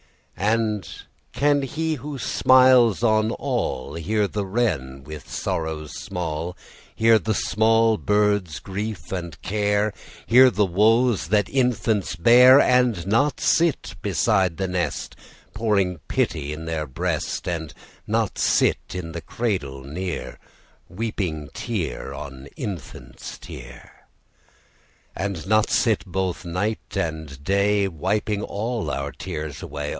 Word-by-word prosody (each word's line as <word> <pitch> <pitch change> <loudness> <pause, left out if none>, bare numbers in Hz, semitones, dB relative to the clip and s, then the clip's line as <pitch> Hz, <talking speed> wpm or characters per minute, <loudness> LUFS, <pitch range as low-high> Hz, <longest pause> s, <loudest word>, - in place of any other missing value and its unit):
And 105 -2 0 0.4
can 145 0 +2
He 160 +4 -2
who 145 +1 -6
smiles 130 -4 +5
on 110 -1 +3
all 65 - -2
Hear 100 +6 0
the 100 -1 -3
wren 80 - -1
with 75 0 -9
sorrows 80 -2 -3
small, 85 -1 -4 0.4
Hear 115 0 +5
the 110 0 -1
small 110 +1 +3
bird's 105 -5 +1
grief 100 -4 -5
and 85 -5 -5
care, 105 +1 +1 0.3
Hear 130 +2 +7
the 105 -4 +2
woes 110 +3 +3
that 105 +2 +2
infants 115 -8 0
bear— 125 +9 +7
And 125 -8 +3
not 115 +9 +2
sit 160 -10 +1
beside 95 -4 +1
the 95 - -1
nest, 90 -5 -3 0.4
Pouring 100 -5 +1
pity 75 -3 -1
in 80 +2 -6
their 80 -2 -3
breast, 65 +6 -3
And 80 -4 -3 0.4
not - - 0
sit - - +3
the 85 -2 -5
cradle 75 - -3
near, 85 +6 -5 0.5
Weeping 90 -7 -3
tear 105 -9 -4
on 70 -1 -8
infant's 80 - -7
tear? 60 0 -12 1.1
And 95 -3 -4
not 110 +1 +3
sit 115 -5 +2
both 95 0 -2
night 95 +5 -3
and 80 -4 -4
day, 100 +2 +2
Wiping 100 +5 -1
all 110 -3 -3
our 70 0 -3
tears 75 -2 -6
away? 75 0 -5
100 Hz, 120 wpm, -23 LUFS, 80-110 Hz, 1.1 s, Hear